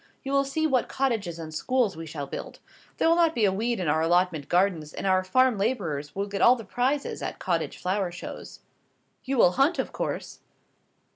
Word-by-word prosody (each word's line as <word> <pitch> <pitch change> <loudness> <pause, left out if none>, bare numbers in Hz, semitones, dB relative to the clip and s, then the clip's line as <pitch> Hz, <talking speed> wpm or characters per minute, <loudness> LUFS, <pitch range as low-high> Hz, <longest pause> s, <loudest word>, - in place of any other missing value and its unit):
You 270 - -4
will 275 0 +3
see 315 +4 -1
what 265 -6 +1
cottages 225 -11 -1
and 160 -1 -7
schools 245 +3 0
we 165 0 -7
shall 145 -2 -5
build. - - -7 0.4
There - - +2
will 330 - +5
not 335 -2 +3
be 225 - +3
a 195 - +3
weed 230 +4 -1
in 180 - -2
our 155 +2 +2
allotment 170 -3 +1
gardens, 175 -4 +1
and - - -5
our 185 -1 +3
farm 255 +3 +3
labourers 165 - -2
will 200 +1 -1
get 200 -1 -4
all 245 - +7
the 230 -3 -9
prizes 260 +7 -1
at - - -4
cottage - - -2
flower 185 0 -1
shows." 175 - -9 0.6
"You 270 0 -1
will 180 - +6
hunt, 275 - +2
of - - -2
course?" - - -4
200 Hz, 205 wpm, -26 LUFS, 175-260 Hz, 0.6 s, all